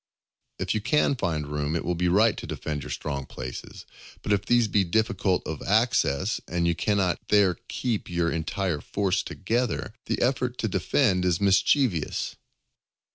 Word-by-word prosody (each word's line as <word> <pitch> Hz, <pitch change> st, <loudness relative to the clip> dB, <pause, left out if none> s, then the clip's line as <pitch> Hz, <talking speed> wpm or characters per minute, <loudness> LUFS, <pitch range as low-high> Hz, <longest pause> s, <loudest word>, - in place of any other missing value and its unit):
If -, -, -1 dB
you 110 Hz, -, -1 dB
can 145 Hz, +6 st, +2 dB
find 80 Hz, -, -2 dB
room, 75 Hz, +1 st, -2 dB
it 85 Hz, -, -2 dB
will 90 Hz, -, 0 dB
be 90 Hz, +1 st, 0 dB
right 105 Hz, +5 st, +4 dB
to -, -, -6 dB
defend 75 Hz, -2 st, -4 dB
your -, -, -8 dB
strong 70 Hz, -3 st, -4 dB
places; 65 Hz, -1 st, -8 dB, 0.4 s
but 105 Hz, -, +1 dB
if 100 Hz, -1 st, +1 dB
these 120 Hz, -1 st, +3 dB
be 100 Hz, -1 st, +2 dB
difficult 100 Hz, 0 st, 0 dB
of -, -, -5 dB
access, 95 Hz, -, +1 dB
and 85 Hz, -1 st, 0 dB
you 85 Hz, -, +3 dB
cannot 95 Hz, 0 st, +1 dB
there 100 Hz, -4 st, +4 dB
keep 115 Hz, -7 st, -2 dB
your 85 Hz, -1 st, 0 dB
entire 85 Hz, 0 st, -2 dB
force 100 Hz, -2 st, 0 dB
together, 115 Hz, +1 st, -2 dB
the -, -, -1 dB
effort 125 Hz, -1 st, 0 dB
to 110 Hz, -, -1 dB
defend 95 Hz, 0 st, +1 dB
is 90 Hz, -2 st, +1 dB
mischievous. 100 Hz, -, +2 dB
95 Hz, 165 wpm, -26 LUFS, 85-110 Hz, 0.4 s, right